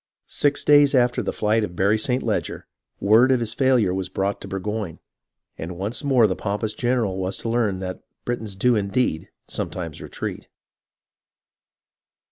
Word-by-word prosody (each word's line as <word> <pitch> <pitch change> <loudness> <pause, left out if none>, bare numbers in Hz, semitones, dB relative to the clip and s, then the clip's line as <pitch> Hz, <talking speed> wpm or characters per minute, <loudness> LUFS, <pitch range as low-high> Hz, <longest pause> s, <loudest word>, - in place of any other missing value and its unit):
Six 145 0 0
days 145 -1 +6
after 125 0 +3
the 100 - -2
flight 110 +1 +1
of 90 -4 -5
Barry 100 +4 +2
St. 125 +3 0
Leger, - - -2 0.3
word 110 +6 +5
of 130 - +3
his 115 -2 -2
failure 125 -8 +3
was 95 0 -3
brought 95 +2 -2
Burgoyne; 100 -2 -4 0.6
and 85 +2 -6
once 105 +5 -3
more 130 -5 +4
the 95 -3 +1
pompous 105 +1 -2
general 120 -6 0
was 95 +1 -2
to 115 - -5
learn 115 -5 +1
that 95 -1 -5 0.2
Britons 115 -5 -3
do 120 +5 +3
indeed 100 -4 0 0.2
sometimes 85 -4 -5
retreat. - - -5
105 Hz, 150 wpm, -23 LUFS, 95-125 Hz, 0.6 s, days